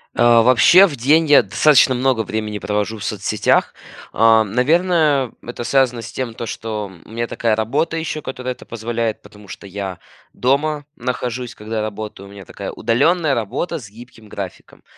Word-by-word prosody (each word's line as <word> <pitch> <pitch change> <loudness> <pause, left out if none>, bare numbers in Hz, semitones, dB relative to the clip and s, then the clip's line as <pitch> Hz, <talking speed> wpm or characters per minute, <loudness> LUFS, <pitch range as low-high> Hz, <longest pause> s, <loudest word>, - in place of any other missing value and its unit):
А, 120 -1 +5
вообще 130 - +6
в 145 - -6
день 150 +7 +3
я 145 - +7
достаточно 130 +5 +4
много 125 -3 +1
времени 105 0 -4
провожу 105 +2 -2
в 105 - -8
соцсетях. 105 0 0 0.4
А, 115 0 +5
наверное, 145 - +2
это 120 0 -7
связано 125 -1 +1
с 115 - -9
тем, 125 -3 -4
то, 115 - -6
что 105 -3 -5
у - - -18
меня 115 +1 -3
такая 115 -2 0
работа 135 +9 -1
ещё, 160 -1 -3
которая 130 -2 -5
это 125 - -16
позволяет, 115 -1 -3
потому 105 0 -16
что 95 - -10
я 95 -1 -6 0.3
дома 145 +3 0
нахожусь, 125 0 -4
когда 110 +1 -4
работаю, 105 -2 -6
у - - -14
меня 100 -1 -11
такая - - -7
удалённая 145 +7 +1
работа 135 - -3
с 110 -7 -12
гибким 115 0 -15
графиком. 95 -3 -9
115 Hz, 170 wpm, -19 LUFS, 105-135 Hz, 0.4 s, я